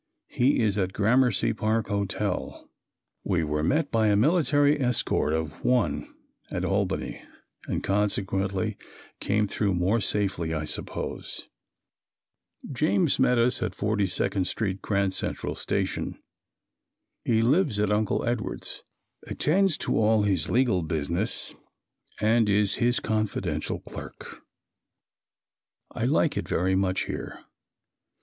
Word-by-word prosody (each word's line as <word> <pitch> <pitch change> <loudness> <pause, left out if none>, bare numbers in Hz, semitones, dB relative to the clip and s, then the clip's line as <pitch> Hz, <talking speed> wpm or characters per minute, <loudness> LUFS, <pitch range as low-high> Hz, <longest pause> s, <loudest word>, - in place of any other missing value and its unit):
He 125 -1 +2
is 105 -2 +1
at 95 -1 -1
Gramercy 115 +1 +2
Park 110 0 -1
Hotel. 100 -1 -2 0.6
We 90 -4 0
were 75 0 -1
met 145 - +1
by 110 -2 +3
a 105 - +4
military 145 - +3
escort 125 -10 +1
of 80 -1 -3
"one" 125 -3 +1 0.4
at - - -2
Albany - - -1 0.5
and - - -2
consequently 100 -1 0 0.4
came 105 +1 +1
through 100 -1 0
more 95 +6 +1
safely, 95 -6 0
I 75 -1 -2
suppose. - - -4 1.2
James 155 +4 +1
met 125 -1 +4
us 120 +2 +2
at 95 - -2
42d 100 -2 0
Street 95 -3 -2
Grand 100 -2 0
Central - - -3
Station. - - -2 1.0
He 115 -1 +2
lives 140 - +2
at 105 0 +1
Uncle 105 0 0
Edward's; 120 -1 -3 0.5
attends 190 +2 +2
to - - -1
all 110 0 +4
of - - +1
his 95 -5 +1
legal 120 -7 +2
business 85 +6 -1 0.7
and 110 0 +3
is 100 -1 +3
his 120 +1 +3
confidential 100 -8 -2
clerk. - - -10 1.5
I - - -2
like - - +2
it - - -3
very 95 +2 +1
much 95 -1 +1
here. - - -6
105 Hz, 120 wpm, -26 LUFS, 95-120 Hz, 1.5 s, a